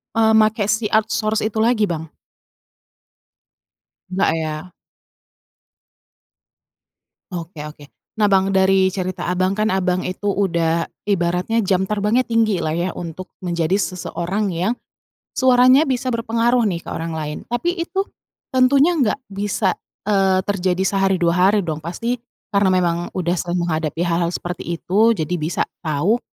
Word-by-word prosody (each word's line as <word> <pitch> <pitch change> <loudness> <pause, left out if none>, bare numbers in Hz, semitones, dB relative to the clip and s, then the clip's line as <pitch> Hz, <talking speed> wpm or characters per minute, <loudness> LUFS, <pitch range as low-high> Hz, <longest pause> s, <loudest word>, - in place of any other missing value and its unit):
eee, 220 -1 +4
makai 215 -1 +3
si 220 -1 0
outsource 215 0 +1
itu 220 0 -1
lagi, 225 -1 +3
Bang? 160 -5 -3 2.0
Nggak 190 +1 +2
ya. 155 +3 -5 2.6
Oke 170 -3 -6
oke. 150 -1 -10 0.3
Nah, 210 - +4
Bang, 195 0 +3
dari 190 0 +4
cerita 185 -1 -3
Abang 185 +2 +1
kan 215 0 +1
Abang 185 -1 0
itu 195 +3 -2
udah 170 -4 +1 0.2
ibaratnya 180 +4 +1
jam 190 0 +1
terbangnya 210 +4 +1
tinggilah 215 -9 +1
ya 175 +2 -1
untuk 175 +2 -7
menjadi 175 -1 -1
seseorang 185 +2 -2
yang, 185 +8 0 0.6
suaranya 255 +3 +5
bisa 255 -1 -1
berpengaruh 230 +1 +1
nih 175 -5 -1
ke - - -14
orang 165 0 -4
lain. 150 -1 -4
Tapi 245 +10 -1
itu, 375 +3 -1 0.5
tentunya 275 +6 +4
nggak 255 -1 +1
bisa, 200 -1 0 0.3
eee, 195 -2 +3
terjadi 190 -2 0
sehari, 195 0 +2
2 175 +1 +3
hari 205 -1 +2
dong 155 -3 -3
pasti 230 +10 -3 0.3
karena 200 -2 +3
memang 175 -2 +2 0.2
udah 175 -1 0
sering 175 +1 -2
menghadapi 160 -1 -1
hal-hal 170 0 +1
seperti 175 -1 -4
itu 215 +7 +3
jadi 170 -2 -2
bisa 155 +2 -1 0.2
tahu, 160 +8 +1
190 Hz, 135 wpm, -20 LUFS, 175-220 Hz, 2.6 s, suaranya